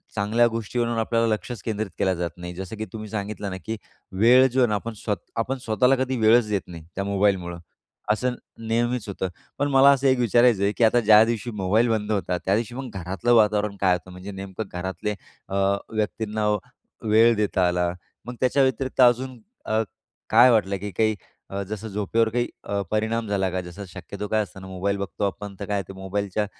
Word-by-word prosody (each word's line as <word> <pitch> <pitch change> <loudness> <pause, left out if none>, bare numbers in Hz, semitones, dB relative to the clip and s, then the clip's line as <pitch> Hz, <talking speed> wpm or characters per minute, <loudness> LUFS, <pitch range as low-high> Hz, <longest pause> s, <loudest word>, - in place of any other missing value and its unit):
चांगल्या 110 +3 +3
गोष्टीवरून 115 +1 -2
आपल्याला 115 +1 +1
लक्षच 110 +2 -3
केंद्रित 110 -2 -3
केलं 95 - +2
जात 85 0 -2
नाही 90 0 -7
जसं 95 +3 -6
की 110 - -3
तुम्ही 110 -1 -6
सांगितलं 105 -1 -4
ना, 95 - -5
की 110 0 -3 0.4
वेळ 125 +4 +7
जो 130 +1 -1
आहे 125 - +5
ना, 105 - 0
आपण 115 +3 -4
स्व 105 0 -2 0.2
आपण 125 +4 -1
स्वतःला 125 +4 +3
कधी 130 0 -2
वेळच 110 +1 +5
देत 100 -2 0
नाही 85 -2 -9
त्या 100 - -1
मोबाईलमुळं, 95 -3 0 0.5
असं 125 +3 0 0.3
नेहमीच 120 0 0
होतं. 95 -1 -3 0.3
पण 145 - +1
मला 135 +1 +7
असं 135 0 +2
एक 130 -1 +3
विचारायचं 120 -3 +4
आहे, 100 - +3
की - - +2
आता 115 +2 +5
ज्या 110 -1 +7
दिवशी 115 +1 -2
मोबाईल 105 +3 +1
बंद 110 -1 0
होता, 95 -3 0
त्यादिवशी 110 +5 0
मग 130 -1 -5
घरातलं 95 +6 0
वातावरण 105 -2 +3
काय 95 -2 +4
होतं? 90 +1 -9
म्हणजे 90 +3 -8
नेमकं 95 +2 -6
घरातले 95 +4 -3 0.3
अ, 95 - -3 0.3
व्यक्तींना 110 0 -2 0.6
वेळ 115 +2 +6
देता 100 -4 +1
आला 90 0 +1 0.3
मग 125 +1 -6
त्याच्याव्यतिरिक्त 130 0 +1
अजून 125 +1 +3 0.3
अ, 110 +1 +1 0.5
काय 120 +3 +7
वाटलं 100 -4 +2
की 100 +2 -6
काही 110 +3 +1 0.3
अ, 100 0 -3
जसं 110 +1 -5
झोपेवर 105 +2 0
काही 120 +2 0 0.2
अ, 100 0 -2
परिणाम 110 +1 0
झाला 100 -2 0
का 95 0 -2
जसं 90 +3 -9
शक्यतो 100 +3 -7
काय 110 +1 +1
असतं 95 -2 -12
ना 95 - -9
मोबाईल 95 +2 -2
बघतो 100 0 -4
आपण 100 0 -6
तर 100 - -4
काय 105 - -2
आहे 100 - -1
ते - - -8
मोबाईलच्या 100 +2 -2
105 Hz, 195 wpm, -24 LUFS, 100-115 Hz, 0.6 s, वेळ